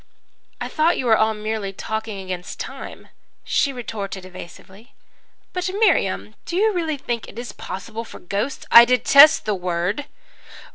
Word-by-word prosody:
"'I - - -4
thought 320 +3 +2
you 255 - -2
were 225 -2 +5
all 220 0 +2
merely 210 -2 -3
talking 220 +1 -5
against 180 -1 -6
time,' - - -8 0.3
she 280 - +1
retorted 205 -7 -6
evasively. 190 +6 -13 0.6
"'But, 360 0 -2
Miriam, 105 - +2
do 340 - -4
you 430 +3 +3
really 325 -4 -1
think 240 -4 -4
it - - -13
is 240 0 -6
possible 220 +4 -7
for - - -11
ghosts 205 +9 -4
' - - -40
"'I 235 0 +10
detest 280 +5 +6
that 215 - 0
word!' 180 +7 -2
220 Hz, 155 wpm, -22 LUFS, 195-275 Hz, 0.6 s, I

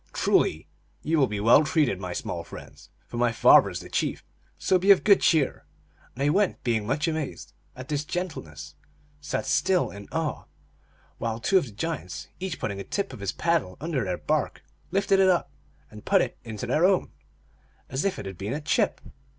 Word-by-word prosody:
" - - -33
Truly, 80 - +1 0.4
ye 160 - +1
will 140 -4 +4
be 105 -2 -4
well 115 +8 +6
treated, 145 - +1
my 90 -1 -5
small 85 -1 -4
friends, - - -12 0.2
for 120 - -8
my 120 0 +2
father 115 - +6
is - - -5
the - - -10
chief; - - -2 0.3
so 185 - +2
be 190 +3 0
of 200 - +7
good 200 -2 +5
cheer! 155 -5 +2 0.3
" - - -31
And 145 +4 +2
they> 200 -1 +2
being 110 -4 0
much 145 +7 0
amazed 160 -3 -4 0.2
at 130 0 -9
this 145 0 -1
gen 175 +4 -2
tleness, 75 - -10 0.5
sat 145 0 -3
still 185 -1 +2
in 100 0 -10
awe, 160 -2 -2 0.7
while 115 0 -2
two 190 +11 +3
of 175 - -4
the - - -10
giants, 130 - -5
each 185 -3 -4
putting 100 -2 -3
a - - -4
tip 200 - -3
of - - -9
his 100 -1 -2
paddle 165 - 0
under 150 -5 -2
their 90 -3 -2
bark, - - -1 0.3
lifted 195 +2 +2
it 190 -1 +5
up 175 -6 +1 0.4
and 105 -1 -11
put - - +3
it - - -5
into 115 0 -6
their 140 +7 +1
own, 190 0 +3 0.8
as 135 +2 -2
if 195 -1 0
it - - -7
had 95 -2 -8
been 100 +5 -3
a 150 - -3
chip. 150 - 0
140 Hz, 205 wpm, -26 LUFS, 105-170 Hz, 0.8 s, of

